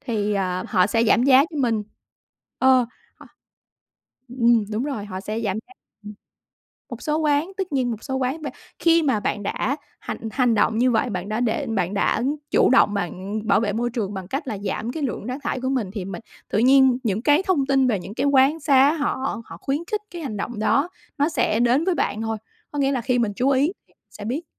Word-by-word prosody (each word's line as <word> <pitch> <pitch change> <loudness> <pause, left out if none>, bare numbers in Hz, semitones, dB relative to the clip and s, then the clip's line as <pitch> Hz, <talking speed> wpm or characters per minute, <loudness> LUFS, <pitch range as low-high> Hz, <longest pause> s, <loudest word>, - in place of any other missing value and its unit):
thì, 210 -3 -1
ờ, 185 -2 -1
họ 185 -3 +3
sẽ 225 +2 +1
giảm 230 +1 +4
giá 270 +1 +6
cho 315 - -7
mình 230 -5 +1 0.8
ờ, 260 -2 +4 0.3
ho - - -15 1.0
ừm, 235 -3 +3
đúng 220 +4 -1
rồi, 270 -8 -4
họ 190 -2 -6
sẽ 215 +3 -4
giảm 205 -4 -1
giá, 380 - -17 0.3
ừm, 210 0 -8 0.8
một - - -8
số 305 -1 0
quán 305 +2 +1
tất 380 -3 -3
nhiên 255 -3 +1
một 220 -1 -6
số 265 - -3
quán 265 +4 -1
v 300 - -4 0.3
khi 335 -1 +4
mà 260 -7 +2
bạn 205 0 -2
đã 240 +7 -1 0.2
hành - - -5
hành 245 -2 +2
động 220 +1 +2
như 250 +2 +3
vậy, 235 +2 +1
bạn 185 -1 -4
đã 215 +1 -1
để 240 -2 0
bạn 195 -4 -1
đã 205 +3 +1 0.3
chủ - - +4
động 250 -5 +5
bạn 200 +2 -3
bảo - - +4
vệ 210 -2 -1
môi 240 +3 -1
trường 220 -5 -3
bằng 190 -2 -6
cách 275 - -4
là 215 - -3
giảm 205 +4 -3
cái 305 +3 -4
lượng 245 -6 -3
rác 250 +2 -3
thải 260 - -2
của 260 - -1
mình, 250 -8 -1
thì 200 -4 -4
mình 195 +2 -6 0.3
tự - - 0
nhiên 260 +1 +5
những 215 -2 0
cái 295 +7 +3
thông 360 -8 +1
tin 270 -1 +3
về 215 -6 +1
những 190 +3 -8
cái 235 - -1
quán 280 +3 +4
xá 280 0 +4
họ 275 -6 -2
họ - - -10
khuyến 275 +2 -2
khích 425 -1 0
cái 345 -1 -7
hành 245 -9 -4
động 220 +2 -4
đó 275 +9 +2 0.3
nó 290 +2 +2
sẽ 220 -8 +1
đến 245 +5 +3
với 370 -2 +1
bạn 220 - -1
thôi, 225 0 -2 0.3
có 290 - -4
nghĩa 275 0 +2
là 260 -3 -1
khi 245 +1 +1
mình 220 -4 0
chú 255 +5 +1
ý 280 +4 +3 0.4
sẽ 205 - -9
biết. 275 +10 -3
245 Hz, 230 wpm, -23 LUFS, 215-275 Hz, 1.0 s, giá